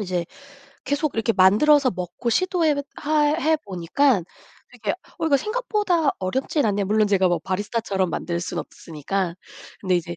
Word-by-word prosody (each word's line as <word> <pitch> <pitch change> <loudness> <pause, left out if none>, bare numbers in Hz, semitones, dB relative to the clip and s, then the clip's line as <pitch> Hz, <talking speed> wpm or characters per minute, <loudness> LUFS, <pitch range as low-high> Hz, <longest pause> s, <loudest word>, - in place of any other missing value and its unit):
이제 180 -3 -2 0.6
계속 285 +2 -1
이렇게 225 +1 +1
만들어서 255 +9 +5
먹고 180 +5 -4
시도해 340 +2 +2 0.2
할 300 +1 +1
해 315 0 +3
보니깐 195 - +1 0.5
되게 - - -3 0.3
'어 320 - -1
이거 285 - +4
생각보다 415 - 0
어렵진 265 +9 -1
않네.' 205 -1 0
물론 215 +2 +2
제가 190 -2 +3
뭐 175 - +1
바리스타처럼 195 +1 -2
만들 170 -1 -3
순 175 - -4
없으니까. 170 +3 -4 0.5
근데 185 -2 +1
이제 175 0 -4
215 Hz, 335 characters per minute, -23 LUFS, 185-295 Hz, 0.6 s, 만들어서